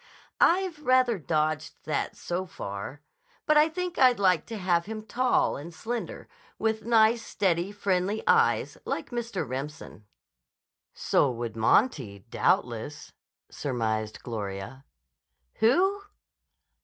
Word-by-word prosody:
"I've 355 -3 +3
rather 255 -4 +3
dodged 155 0 -1
that, - - -2
so 180 +2 -4
far. 110 - -7 0.4
But 305 - +3
I 300 +1 +6
think 360 +2 -4
I'd 255 -2 +6
like 185 -5 +3
to 225 - -5
have 175 -3 +1
him 220 0 -5
tall 250 +3 +1
and 155 +5 -8
slender 225 +8 -5
and - - -20 0.3
with 220 0 -1
nice, 225 0 +4
steady, 190 -4 0
friendly 200 +1 -1
eyes, - - +3
like - - -4
Mr. 235 - -3
Remsen." 130 -4 -7 0.9
"So 140 - +2
would 120 -2 -4
Monty, 115 - +1
doubtless," 125 +6 -1 0.4
surmised 110 -5 -2
Gloria. 110 +3 -6 0.7
"_Who? 380 - +3
185 Hz, 120 wpm, -27 LUFS, -, 0.9 s, I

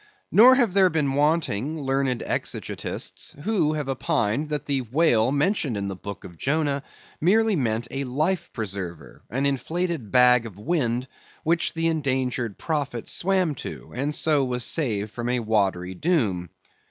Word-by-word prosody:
Nor 250 +5 +8
have 240 -8 +2
there 190 -1 +5
been 150 -5 0
wanting 150 -1 +1
learned 135 -2 0
exegetists - - -4
who 185 -8 +1
have 150 -3 -3
opined 130 +1 0
that 150 -1 -3
the 140 -2 0
whale 125 -2 +2
mentioned 145 - +1
in 100 0 -2
the 95 - -4
book 100 0 -8
of 85 -3 -12
Jonah 145 -1 0 0.4
merely 215 +5 +3
meant 115 -5 -1
a 135 +1 -2
life 155 +9 -1
preserver—an 100 - -5
inflated 160 - -2
bag 125 -2 +5
of 100 -4 -12
wind—which 130 +5 -2
the 165 0 -1
endangered 130 -8 -1
prophet 140 -7 -3
swam 185 -3 +1
to, 135 - -8
and 145 +4 -1
so 150 -3 +3
was 125 -1 -1
saved 110 -8 -1
from 120 +1 -4
a 125 0 +1
watery 100 -5 0
doom. 100 - 0
135 Hz, 145 wpm, -25 LUFS, 115-160 Hz, 0.4 s, Nor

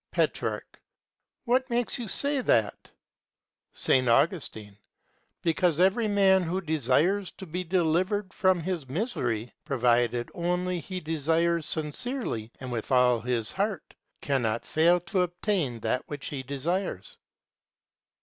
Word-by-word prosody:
Petrarch. - - -2 0.6
What 255 +2 +1
makes 240 +2 +3
you 235 - -4
say 280 +7 +3
that? 110 - 0 0.9
S. 130 -1 +2
Augustine. 115 - 0 0.7
Because 170 -1 +1
every 195 +5 +3
man 195 -2 +4
who 180 +2 -2
desires 160 - +1
to 190 - -10
be 180 +2 -4
delivered 185 +3 0
from 185 -3 +2
his 165 -6 -4
misery, 125 - -2
provided 120 -3 +1
only 180 +1 -1
he 185 +3 -6
desires 165 +1 0
sincerely 155 - -2
and 130 -1 -6
with 115 0 -4
all 125 -2 +4
his 115 -2 -2
heart, 200 -2 -3 0.3
cannot 120 -5 -1
fail 170 +3 +3
to 185 +2 -1
obtain 175 - -1
that 125 - 0
which 145 -2 -6
he 140 -3 -4
desires. 140 - -3
165 Hz, 120 wpm, -27 LUFS, 130-190 Hz, 0.9 s, man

